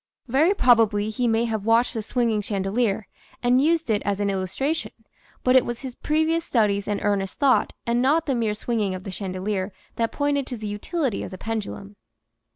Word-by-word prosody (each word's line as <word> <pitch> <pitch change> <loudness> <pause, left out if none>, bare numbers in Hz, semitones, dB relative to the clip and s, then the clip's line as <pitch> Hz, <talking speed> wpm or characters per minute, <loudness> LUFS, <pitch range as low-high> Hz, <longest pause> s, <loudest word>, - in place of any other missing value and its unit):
Very 305 - +3
probably 220 - +4
he 245 +2 0
may 225 0 +2
have 220 -3 -2
watched 230 +3 +3
the 225 - -2
swinging 225 -1 0
chandelier 200 +1 -1 0.4
and 250 +2 +4
used 325 +2 +2
it 210 - +1
as 200 -1 -1
an 200 -1 +1
illustration, 195 - -2 0.5
but 255 0 +4
it 260 - +7
was 240 -1 -5
his 260 -2 -6
previous 315 +4 0
studies 205 -7 +1
and 205 -1 -1
earnest 195 -2 0
thought 275 -3 +3
and 235 +1 +1
not 300 +5 +3
the 275 - 0
mere 225 -4 0
swinging 210 -3 -1
of 185 - -8
the 195 - -6
chandelier 190 +1 -3 0.3
that 230 -1 0
pointed 285 -2 0
to 250 - -5
the 215 - -7
utility 225 - -2
of - - -5
the 185 - -8
pendulum. 205 -2 -5
225 Hz, 190 wpm, -24 LUFS, 205-255 Hz, 0.5 s, it